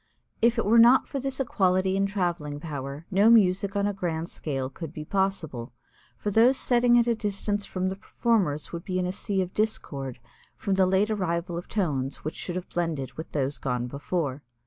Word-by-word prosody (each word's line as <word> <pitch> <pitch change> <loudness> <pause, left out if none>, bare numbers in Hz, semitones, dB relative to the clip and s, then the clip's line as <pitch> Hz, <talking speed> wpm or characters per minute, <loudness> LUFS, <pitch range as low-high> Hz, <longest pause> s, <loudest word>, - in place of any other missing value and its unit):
If 235 +1 +4
it 230 - +1
were 230 +3 +5
not 240 +3 +7
for 275 - -3
this 270 0 -3
equality 190 -6 +2
in 195 0 +2
traveling 175 -7 -2
power, 145 -1 -6
no 200 +4 +5
music 200 -3 +4
on 200 0 +1
a 205 - 0
grand 170 -3 -3
scale 135 -4 -3
could 145 +3 -8
be 155 -2 -7
possible, 160 -11 -2 0.4
for 210 - -2
those 235 +6 +5
sitting 240 -1 +4
at 235 - +4
a 240 - +2
distance 205 -1 -2
from 185 0 -1
the 190 - -4
performers 195 -7 0
would 170 0 -5
be 185 -1 -2
in 180 - 0
a 180 - -1
sea 190 0 -1
of 180 - -8
discord 140 - -2 0.4
from 200 - -1
the 190 -1 +4
late 195 +3 +2
arrival 175 -3 -1
of 175 - -5
tones 140 -9 -2
which 155 - -3
should 175 - -5
have 185 0 -4
blended 160 -7 -2
with 160 +1 -8
those 140 -1 -1
gone 125 -2 -1
before. 140 +1 -3
185 Hz, 200 wpm, -27 LUFS, 155-205 Hz, 0.4 s, not